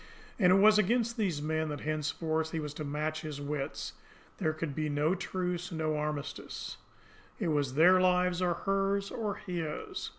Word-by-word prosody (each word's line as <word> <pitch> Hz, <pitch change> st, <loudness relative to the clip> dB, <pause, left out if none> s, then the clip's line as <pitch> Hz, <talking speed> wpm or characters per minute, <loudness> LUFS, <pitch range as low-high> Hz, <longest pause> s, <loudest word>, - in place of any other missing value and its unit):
And 180 Hz, -3 st, +6 dB
it -, -, +7 dB
was 210 Hz, +2 st, +7 dB
against 235 Hz, +3 st, +2 dB
these 180 Hz, -10 st, -1 dB
men 155 Hz, 0 st, 0 dB
that 145 Hz, -2 st, -4 dB
henceforth 155 Hz, +1 st, -1 dB
he 165 Hz, -, 0 dB
was 150 Hz, -2 st, -4 dB
to 155 Hz, -, -5 dB
match 155 Hz, +2 st, -2 dB
his 150 Hz, -2 st, -5 dB
wits! 145 Hz, 0 st, -3 dB, 0.5 s
There 160 Hz, -5 st, +2 dB
could 155 Hz, -1 st, -4 dB
be 155 Hz, +1 st, -1 dB
no 150 Hz, +3 st, +2 dB
truce, 180 Hz, -1 st, -3 dB
no 155 Hz, -2 st, -1 dB
armistice. 150 Hz, -1 st, -4 dB, 0.6 s
It 185 Hz, -7 st, 0 dB
was 145 Hz, -4 st, 0 dB
their 180 Hz, +4 st, +7 dB
lives, 180 Hz, -1 st, +3 dB
or 175 Hz, -2 st, +2 dB
hers, 195 Hz, 0 st, +1 dB
or 210 Hz, -3 st, -2 dB
his! 170 Hz, -5 st, -4 dB
160 Hz, 170 wpm, -31 LUFS, 150-185 Hz, 0.6 s, it